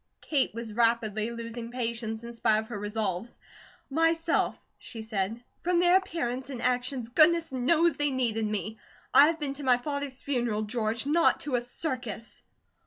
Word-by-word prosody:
Kate 285 -4 +1
was 230 -2 -5
rapidly 230 -1 +1
losing 230 0 -6
patience 230 -2 -3
in 235 0 -7
spite 220 -2 +3
of 220 0 -3
her 220 -4 -5
resolves. 210 0 -3 0.5
"Myself," 330 +3 +1 0.2
she 225 -2 -7
said. 220 +1 -3 0.2
"From 350 0 +2
their 350 +1 +5
appearance 265 -9 -1
and 260 -3 -5
actions, 250 0 -1
goodness 325 +4 +4
knows 315 +7 +2
they 290 0 +2
needed 230 -5 0
me. 215 +1 -3 0.3
I 290 - +8
have 325 0 -1
been 285 -2 -2
to 285 +1 -8
my 255 -2 +4
father's 285 0 -4
funeral, 240 -6 -1
George; 220 +1 -1
not 330 +4 +3
to 290 - -4
a 245 - +2
circus." 245 -3 -4
245 Hz, 165 wpm, -28 LUFS, 225-285 Hz, 0.5 s, I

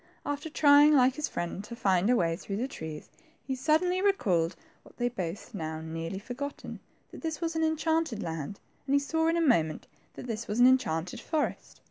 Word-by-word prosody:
After 290 +2 -3
trying, 295 0 +6
like 255 -1 +5
his 300 +2 -2
friend, 175 +3 -4
to 235 - -8
find 195 -3 +2
a 250 - +5
way 165 -6 +1
through 195 +3 -5
the 250 +4 -1
trunks, 160 - -7 0.4
he 265 - -2
suddenly 320 +7 +2
recalled 185 - +2 0.3
what - - -19
they 240 - -1
had 245 - -2
both 185 +6 -5
now 160 -4 -4
nearly 165 +3 -5
forgotten, 260 +7 -6 0.3
that - - -10
they 325 - -1
were 335 - -1
in 320 - -1
the 320 - +3
enchanted 315 -6 0
land, 165 +3 -5 0.3
and 280 +1 +4
saw 320 +3 0
in 330 +1 +2
a - - +2
moment 165 - +2 0.3
that - - -8
this 230 -2 -4
was 210 +3 -2
an 245 - +8
enchanted 180 -10 +2
forest. 315 -2 -3
245 Hz, 200 wpm, -29 LUFS, -, 0.4 s, an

